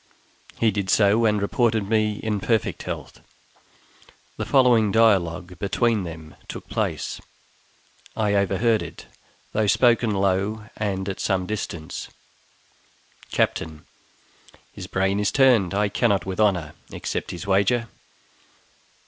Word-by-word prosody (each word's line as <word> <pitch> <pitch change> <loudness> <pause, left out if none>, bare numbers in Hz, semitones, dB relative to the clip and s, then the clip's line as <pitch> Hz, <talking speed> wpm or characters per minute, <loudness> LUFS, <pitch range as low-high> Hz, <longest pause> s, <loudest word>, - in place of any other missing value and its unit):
He 115 -2 +3
did 100 -1 -3
so, 110 +3 +4
and 105 -1 +2
reported 110 0 +1
me 110 0 +1
in 105 -2 -1
perfect 110 +2 0
health. - - -7 1.1
The - - -4
following 120 -6 +4
dialogue 90 -6 +2
between 105 +1 +1
them 80 -2 -9
took - - -8
place; - - -3 1.0
I 105 -2 +1
overheard 100 +3 +2
it, - - -9 0.5
though 110 -1 +1
spoken 120 +1 +3
low 100 +2 0
and 95 -2 -2
at 95 - -4
some 95 -1 0
distance: 85 -6 -5 1.2
Captain. 80 -1 -1 0.9
His - - -8
brain 95 +1 0
is 105 -1 +1
turned; 120 -9 +4
I 105 +1 +2
cannot 100 -1 +1
with 95 0 -5
honor 90 -8 +1 0.2
accept - - -4
his 90 +1 -6
wager. 100 +5 +2
100 Hz, 120 wpm, -23 LUFS, 95-110 Hz, 1.2 s, so